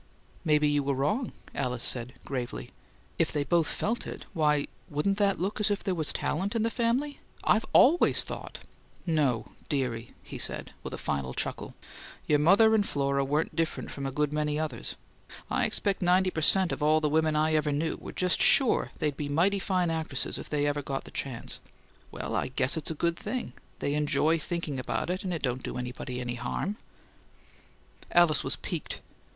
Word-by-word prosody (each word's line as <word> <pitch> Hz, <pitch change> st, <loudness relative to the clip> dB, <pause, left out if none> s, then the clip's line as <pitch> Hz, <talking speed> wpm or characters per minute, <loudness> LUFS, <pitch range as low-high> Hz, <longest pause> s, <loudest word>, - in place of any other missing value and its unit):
"Maybe 150 Hz, -2 st, +4 dB
you 145 Hz, 0 st, +2 dB
were 140 Hz, 0 st, 0 dB
wrong," 210 Hz, -, 0 dB, 0.2 s
Alice 125 Hz, -2 st, -2 dB
said, 125 Hz, 0 st, +1 dB
gravely. 120 Hz, -, -4 dB, 0.5 s
"If -, -, +2 dB
they 145 Hz, -, 0 dB
both 165 Hz, +2 st, +2 dB
felt 230 Hz, +3 st, -2 dB
it, -, -, -7 dB
why 150 Hz, -4 st, +2 dB, 0.2 s
wouldn't 195 Hz, +8 st, 0 dB
that 200 Hz, -1 st, +2 dB
look 195 Hz, +5 st, -2 dB
as 210 Hz, 0 st, +3 dB
if 205 Hz, 0 st, -1 dB
there 190 Hz, -, 0 dB
was 160 Hz, -4 st, +1 dB
talent 195 Hz, +8 st, -1 dB
in 225 Hz, -, +2 dB
the 230 Hz, -, +1 dB
family? 255 Hz, +5 st, 0 dB, 0.2 s
I've 220 Hz, -, +3 dB
ALWAYS 325 Hz, +7 st, +5 dB
thought -, -, -7 dB, 0.3 s
" -, -, -30 dB
"No, 145 Hz, -9 st, +1 dB, 0.2 s
dearie," 125 Hz, -5 st, -2 dB
he -, -, -8 dB
said, -, -, +1 dB
with -, -, -5 dB
a -, -, -8 dB
final 65 Hz, -2 st, -3 dB
chuckle. -, -, -4 dB, 0.5 s
"Your 150 Hz, -1 st, +3 dB
mother 200 Hz, +8 st, +6 dB
and 215 Hz, -2 st, +4 dB
Flora 140 Hz, -5 st, 0 dB
weren't 145 Hz, +4 st, 0 dB
different 165 Hz, -1 st, -1 dB
from 140 Hz, -1 st, -4 dB
a -, -, -3 dB
good 150 Hz, +1 st, 0 dB
many 150 Hz, 0 st, 0 dB
others. 150 Hz, -7 st, -3 dB, 0.6 s
I -, -, +2 dB
expect 200 Hz, -2 st, -1 dB
ninety 185 Hz, +1 st, +4 dB
per 160 Hz, -, -2 dB
cent. 185 Hz, +3 st, +4 dB
of -, -, -3 dB
all 155 Hz, +1 st, +4 dB
the 155 Hz, -, +1 dB
women 155 Hz, +1 st, +2 dB
I 155 Hz, +1 st, +2 dB
ever 150 Hz, -1 st, +2 dB
knew 155 Hz, +3 st, 0 dB
were -, -, -8 dB
just 180 Hz, 0 st, +1 dB
sure 265 Hz, -5 st, +5 dB
they'd 150 Hz, -2 st, -1 dB
be 145 Hz, 0 st, -4 dB
mighty 180 Hz, +7 st, +3 dB
fine 185 Hz, -3 st, +1 dB
actresses 160 Hz, -4 st, -2 dB
if -, -, -8 dB
they 145 Hz, -1 st, +1 dB
ever 145 Hz, 0 st, 0 dB
got 135 Hz, -1 st, -3 dB
the -, -, -12 dB
chance. 130 Hz, -4 st, -4 dB, 0.5 s
Well, -, -, -4 dB
I -, -, 0 dB
guess 130 Hz, +3 st, +1 dB
it's 160 Hz, -, -2 dB
a 160 Hz, -, -3 dB
good 170 Hz, +2 st, 0 dB
thing; 255 Hz, -2 st, -4 dB, 0.2 s
they 140 Hz, -, -1 dB
enjoy 150 Hz, +2 st, +2 dB
thinking 155 Hz, -4 st, -3 dB
about 130 Hz, -, -2 dB
it 185 Hz, +1 st, -3 dB
and 185 Hz, -, -2 dB
it 165 Hz, -, -3 dB
don't 125 Hz, -1 st, -1 dB
do -, -, -5 dB
anybody 125 Hz, 0 st, -5 dB
any 125 Hz, -1 st, -3 dB
harm." 205 Hz, +2 st, -2 dB, 1.3 s
Alice 170 Hz, -3 st, +5 dB
was -, -, 0 dB
piqued. -, -, -5 dB
155 Hz, 195 wpm, -29 LUFS, 140-185 Hz, 1.3 s, mother